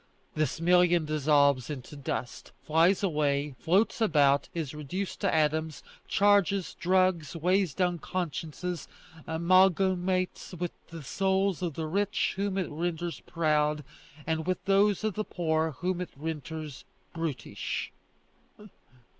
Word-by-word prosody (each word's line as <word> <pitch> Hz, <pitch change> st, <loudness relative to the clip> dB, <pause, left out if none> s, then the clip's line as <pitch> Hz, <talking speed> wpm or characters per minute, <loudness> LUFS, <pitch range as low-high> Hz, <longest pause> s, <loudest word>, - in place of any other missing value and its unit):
This 155 Hz, 0 st, -1 dB
million 175 Hz, -1 st, +4 dB
dissolves 145 Hz, -3 st, +3 dB
into 145 Hz, 0 st, -7 dB
dust, 135 Hz, -2 st, -5 dB
flies 170 Hz, +6 st, +3 dB
away, 145 Hz, -5 st, 0 dB
floats 195 Hz, +7 st, +2 dB
about, 145 Hz, -8 st, +3 dB
is 160 Hz, -5 st, -4 dB
reduced 150 Hz, +6 st, -5 dB
to 195 Hz, -, +2 dB
atoms, 155 Hz, 0 st, 0 dB, 0.2 s
charges, 200 Hz, -2 st, +2 dB
drugs, 185 Hz, -3 st, +2 dB
weighs 180 Hz, 0 st, +1 dB
down 180 Hz, -2 st, 0 dB
consciences, 175 Hz, +1 st, -4 dB, 0.4 s
amalgamates 185 Hz, +2 st, +2 dB
with 175 Hz, 0 st, -3 dB, 0.2 s
the 165 Hz, -2 st, -9 dB
souls 190 Hz, +3 st, 0 dB
of 170 Hz, -5 st, -2 dB
the 160 Hz, -, -3 dB
rich 200 Hz, +5 st, 0 dB
whom 195 Hz, 0 st, -1 dB
it 185 Hz, -4 st, -2 dB
renders 170 Hz, +2 st, -3 dB
proud, 150 Hz, -2 st, +1 dB, 0.4 s
and 160 Hz, 0 st, -2 dB
with 185 Hz, -, -2 dB
those 200 Hz, +1 st, +3 dB
of 215 Hz, -2 st, 0 dB
the 215 Hz, -, -2 dB
poor 160 Hz, -4 st, -1 dB
whom 180 Hz, +5 st, -2 dB
it 180 Hz, -, -4 dB
renders 155 Hz, -1 st, -6 dB, 0.3 s
brutish." 165 Hz, -5 st, -4 dB
170 Hz, 120 wpm, -29 LUFS, 155-185 Hz, 0.4 s, million